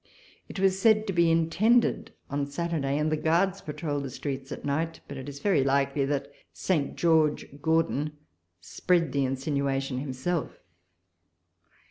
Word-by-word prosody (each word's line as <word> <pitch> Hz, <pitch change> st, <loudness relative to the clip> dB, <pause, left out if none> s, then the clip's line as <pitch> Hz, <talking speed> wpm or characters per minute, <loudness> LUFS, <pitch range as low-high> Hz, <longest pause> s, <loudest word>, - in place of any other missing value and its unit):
It -, -, -6 dB
was 190 Hz, 0 st, +2 dB
said 215 Hz, 0 st, +4 dB
to 195 Hz, -, -2 dB
be 170 Hz, -1 st, +4 dB
intended 175 Hz, +9 st, +2 dB, 0.2 s
on 140 Hz, 0 st, -2 dB
Saturday, 145 Hz, -2 st, -2 dB
and 150 Hz, +1 st, 0 dB
the -, -, +3 dB
Guards 175 Hz, +5 st, +1 dB
patrolled 150 Hz, -1 st, -3 dB
the 135 Hz, -, -4 dB
streets 135 Hz, +1 st, -5 dB
at -, -, -6 dB
night; 160 Hz, +3 st, -1 dB
but 140 Hz, -, -7 dB
it 135 Hz, +1 st, -7 dB
is 140 Hz, -, -8 dB
very 185 Hz, -3 st, +2 dB
likely 140 Hz, +1 st, +1 dB
that 140 Hz, 0 st, -2 dB, 0.2 s
Saint 160 Hz, -7 st, -1 dB
George 160 Hz, -3 st, +2 dB, 0.2 s
Gordon 160 Hz, -2 st, +1 dB, 0.5 s
spread 165 Hz, -, 0 dB
the 140 Hz, -1 st, +1 dB
insinuation 135 Hz, 0 st, -1 dB
himself. 140 Hz, +5 st, -3 dB
150 Hz, 145 wpm, -27 LUFS, 140-170 Hz, 0.5 s, said